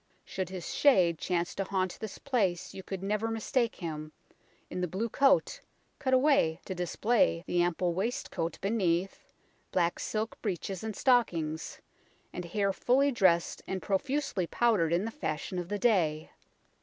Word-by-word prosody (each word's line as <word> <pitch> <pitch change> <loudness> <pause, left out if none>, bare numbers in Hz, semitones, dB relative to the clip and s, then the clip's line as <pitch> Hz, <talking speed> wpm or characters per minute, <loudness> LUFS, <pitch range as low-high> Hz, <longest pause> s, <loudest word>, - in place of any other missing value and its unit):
Should 190 -2 -4
his 185 -2 -5
shade 180 - +4
chance 175 -1 -1
to 195 - -2
haunt 185 -1 -2
this 220 -3 -6
place 200 -11 -1
you 190 - -7
could 190 0 -6
never 210 +3 0
mistake 225 +1 0
him 155 -3 -6 0.5
in 180 - -4
the 180 - 0
blue 200 +7 -2
coat, 280 - +3 0.4
cut 265 -3 -1
away 260 - +4
to 190 - -4
dis 180 -1 -4
play 205 - +2
the 175 - +1
ample 175 0 +1
waistcoat 185 -4 -2
beneath, 190 -3 -1 0.4
black 175 -2 +1
silk 220 +1 -3
breeches 190 -2 -3
and 220 -2 -4
stockings, 170 - +1 0.5
and 180 - -5
hair 195 +3 0
fully 270 +7 +3
dressed 185 -8 +2
and 190 - -2
profusely 215 -2 -1
powdered 210 -9 +2
in 175 +4 +1
the 225 - -3
fashion 185 - -3
of 175 0 -5
the 205 - -1
day. 170 -9 +1
190 Hz, 155 wpm, -30 LUFS, 175-225 Hz, 0.5 s, shade